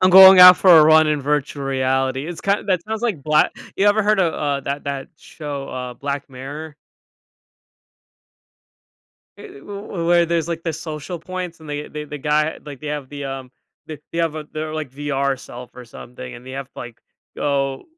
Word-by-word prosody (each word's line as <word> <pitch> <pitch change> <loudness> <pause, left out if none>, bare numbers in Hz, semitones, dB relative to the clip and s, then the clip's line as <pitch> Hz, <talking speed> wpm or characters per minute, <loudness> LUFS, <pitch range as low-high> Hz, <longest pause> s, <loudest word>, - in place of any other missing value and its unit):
"I'm 185 - +5
going 190 0 +10
out 180 0 +11
for 185 - +4
a 155 - +7
run 155 0 +6
in 150 -1 0
virtual 145 0 -2
reality." 130 +1 -1
It's 175 0 -7
kind 200 0 -1
that 180 -3 +1
sounds 220 +1 -4
like 205 - -1
black 150 +1 +3 0.3
you 200 - +2
ever 205 +1 +4
heard 210 -1 +2
of, 170 -3 +2
uh, 145 -2 -1
that 140 +1 -4
that 140 -1 -4
show, 145 -3 -7
uh, 125 -1 -6
Black 140 +1 -5
Mirror? 145 +4 -8 2.6
Eh, - - -13
eh, - - -12
w 200 -3 -6
where 170 0 +4
there's, 165 -1 0
like, 165 -1 -4
the 165 - -2
social 155 +3 -6
points 180 -1 -6
and 155 - -12
they 145 0 -5
they 150 0 -6
the 150 0 -8
guy, 150 +2 0
like 145 -3 -10
they 150 - -8
have 145 -3 -4
the, 145 -1 -7
um, 135 -1 -6 0.4
they 155 -2 -8
they 165 - -3
have 165 -2 0
a 155 - -6
their, 155 0 -4
like, 155 -5 -4
VR 140 -1 -1
self 125 0 -11
or 125 - -10
something, 115 - -10
and 120 +1 -13
they 130 - -8
have 135 0 -5
to, 125 - -16
like, 120 -2 -9 0.4
go 135 -2 -1
150 Hz, 205 wpm, -20 LUFS, 135-170 Hz, 2.6 s, out